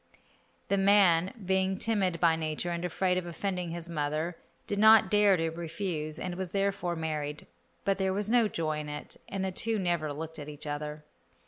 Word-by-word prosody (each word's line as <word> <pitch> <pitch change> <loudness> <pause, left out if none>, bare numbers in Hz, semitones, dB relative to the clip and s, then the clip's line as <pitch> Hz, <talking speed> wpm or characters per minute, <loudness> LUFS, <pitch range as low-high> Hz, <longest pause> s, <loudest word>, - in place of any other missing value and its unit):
The 200 - +2
man, 195 -3 +5
being 190 0 +1
timid 195 -6 0
by 165 -2 +4
nature 160 +2 -3
and 170 0 -3
afraid 180 +1 +1
of 175 - -7
offending 180 +1 -3
his 170 0 -5
mother, 155 +1 -2 0.3
did 205 - -2
not 220 -2 +7
dare 205 -2 +5
to 165 -1 -1
refuse, 165 -2 -4
and 180 - -4
was 185 -1 -4
therefore 195 -3 0
married; 150 -2 -3 0.4
but 195 0 +1
there 190 0 +1
was 205 +2 -1
no 235 0 +4
joy 155 -5 -2
in 150 -1 -6
it, 150 0 -5
and 195 -1 -2
the 190 - -1
two 225 +4 0
never 170 -5 0
looked 160 +2 -6
at 150 0 -7
each 150 0 -7
other. 150 +1 -4
175 Hz, 190 wpm, -30 LUFS, 155-195 Hz, 0.4 s, not